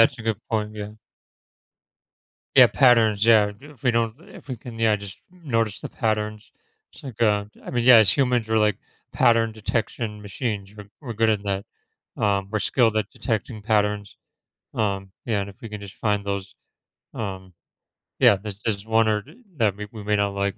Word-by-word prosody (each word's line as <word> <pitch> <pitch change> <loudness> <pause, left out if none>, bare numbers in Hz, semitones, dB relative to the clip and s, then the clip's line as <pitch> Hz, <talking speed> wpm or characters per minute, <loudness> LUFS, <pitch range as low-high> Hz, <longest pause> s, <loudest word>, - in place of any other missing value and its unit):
that's 125 +2 +4
a - - -7
good 110 -1 0
point, 110 -1 -2
yeah. 105 -1 -6 1.7
Yeah, - - +10
patterns, 115 -6 +4
yeah, 110 -3 +5
if 145 -1 -15
we 125 - +3
don't 115 -1 +1 0.2
if - - -14
we 130 - -4
can, 115 0 -10
yeah, 110 -2 +3
just 100 -1 -10
notice 115 - -2
the - - -6
patterns. 110 -1 -2 0.4
It's - - -15
like, 120 -3 -5
uh, 105 -2 +3 0.2
I - - -6
mean, 120 -1 0
yeah, 125 -1 +9
as 105 -5 +7
humans 125 -3 +1
we're, 110 - +2
like, 105 -2 +2 0.4
pattern 115 -1 +3
detection 110 0 -3
machines, 105 -1 -4
we're, 105 -1 -11
we're 125 -6 -6
good 115 +1 +2
at 105 -2 0
that. 100 0 -2 0.6
Um, 100 -2 +1
we're 105 - 0
skilled 110 +2 +2
at 110 - 0
detecting 110 -2 -3
patterns, 105 -2 0 0.6
um, 100 -3 -2
yeah, 105 -4 0
and 100 - -6
if 95 - -16
we 115 - -6
can 105 -1 -7
just 100 -2 -10
find 105 -2 0
those, 100 -1 -4 0.6
um 95 -4 -6 0.7
Yeah, - - +7
there's, 100 0 -7
there's 105 -3 -2
one 110 0 +3
or 105 -1 +1 0.3
that 105 -5 +2
or - - -21
we 105 0 -6
we 110 -3 -9
may 105 +1 +1
not 100 -1 0
like 100 -1 -1
105 Hz, 190 wpm, -24 LUFS, 100-115 Hz, 1.7 s, Yeah